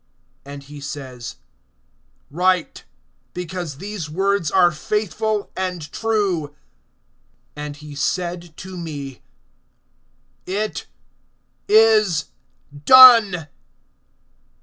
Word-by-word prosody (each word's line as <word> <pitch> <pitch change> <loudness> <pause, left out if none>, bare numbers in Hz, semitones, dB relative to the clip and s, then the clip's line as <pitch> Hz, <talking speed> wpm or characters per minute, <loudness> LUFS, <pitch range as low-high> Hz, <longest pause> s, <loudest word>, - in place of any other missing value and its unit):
And 140 0 -10
he 145 +1 -11
says: 130 -4 -8 1.0
Write; 180 +2 0 0.5
because 175 -4 -6
these 195 -3 -6
words 195 0 0
are 180 -1 +4
faithful 210 +4 -2
and 180 -5 -4
true. 190 -7 -1 1.0
(6)And 150 -1 -6
he 150 0 -11
said 170 +2 -3
to 190 0 -9
me: 145 -6 -7 1.3
It 210 +3 -3 0.8
is 215 -6 +3 0.4
done. 210 - +7
175 Hz, 80 wpm, -20 LUFS, 150-200 Hz, 1.3 s, done